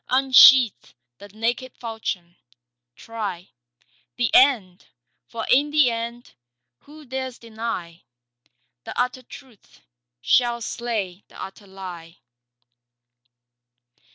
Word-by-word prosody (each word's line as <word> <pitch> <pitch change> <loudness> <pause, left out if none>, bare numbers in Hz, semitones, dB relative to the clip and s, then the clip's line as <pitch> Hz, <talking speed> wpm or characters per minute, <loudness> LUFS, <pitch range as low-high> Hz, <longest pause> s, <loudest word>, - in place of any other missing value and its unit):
Unsheath 260 - +6 0.2
the 200 - -11
naked 230 +5 -3
falchion. 220 -7 -6 0.6
Try 205 -6 -7 0.6
The 240 -2 -1
end. 220 -9 +3 0.4
For 230 -1 -6
in 285 +3 +4
the 295 -5 +3
end, 235 +1 -6 0.5
who 300 +1 -15
dares 260 -1 -5
deny, 220 -7 -6 0.8
The - - -7
utter 250 +1 -1
truth 235 - -16 0.4
shall 240 - +2
slay 215 -6 -4
the - - -16
utter 195 +1 -9
lie. 180 -3 -10
230 Hz, 95 wpm, -23 LUFS, 195-255 Hz, 0.8 s, Unsheath